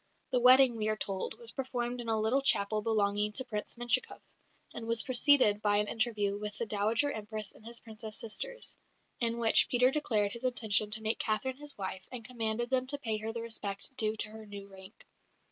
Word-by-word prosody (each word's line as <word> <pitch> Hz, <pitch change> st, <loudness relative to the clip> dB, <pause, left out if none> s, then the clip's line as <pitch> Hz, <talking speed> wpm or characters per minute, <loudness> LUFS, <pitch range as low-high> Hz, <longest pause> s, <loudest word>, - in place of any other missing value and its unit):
The 250 Hz, -, +3 dB
wedding, 255 Hz, -1 st, +7 dB
we 215 Hz, -1 st, -1 dB
are 215 Hz, -, 0 dB
told, 195 Hz, -2 st, -2 dB
was 470 Hz, -1 st, -2 dB
performed 250 Hz, -2 st, -3 dB
in 230 Hz, -, -6 dB
a 220 Hz, -1 st, +1 dB
little 225 Hz, +6 st, +2 dB
chapel 215 Hz, -5 st, +2 dB
belonging 210 Hz, -1 st, +1 dB
to 260 Hz, -, 0 dB
Prince 210 Hz, -4 st, -4 dB
Menshikoff, 240 Hz, -, 0 dB, 0.5 s
and 230 Hz, -1 st, -7 dB
was 230 Hz, -1 st, +2 dB
preceded 255 Hz, -5 st, +5 dB
by 205 Hz, -1 st, +2 dB
an 210 Hz, 0 st, +1 dB
interview 210 Hz, -3 st, 0 dB
with 210 Hz, 0 st, -5 dB
the 235 Hz, -, -2 dB
Dowager 220 Hz, +6 st, +1 dB
Empress 215 Hz, -3 st, -2 dB
and -, -, -18 dB
his 235 Hz, +1 st, -3 dB
Princess 220 Hz, -1 st, -7 dB
sisters, -, -, -2 dB, 0.4 s
in 235 Hz, -1 st, 0 dB
which 230 Hz, -1 st, +4 dB
Peter 250 Hz, +1 st, +4 dB
declared 215 Hz, -9 st, 0 dB
his 235 Hz, -, -5 dB
intention 220 Hz, -4 st, +1 dB
to 220 Hz, +1 st, -3 dB
make 220 Hz, +1 st, 0 dB
Catherine 235 Hz, +5 st, -1 dB
his 295 Hz, 0 st, -4 dB
wife 190 Hz, -1 st, -6 dB
and 240 Hz, -3 st, -8 dB
commanded 235 Hz, 0 st, -3 dB
them 255 Hz, -1 st, +1 dB
to 285 Hz, +2 st, 0 dB
pay 225 Hz, -6 st, -2 dB
her 220 Hz, +1 st, -4 dB
the 230 Hz, 0 st, -5 dB
respect 215 Hz, +1 st, -5 dB
due 215 Hz, -3 st, -1 dB
to 215 Hz, -, -2 dB
her 220 Hz, 0 st, -10 dB
new 200 Hz, -1 st, -9 dB
rank. 190 Hz, +1 st, -14 dB
220 Hz, 205 wpm, -31 LUFS, 210-245 Hz, 0.5 s, wedding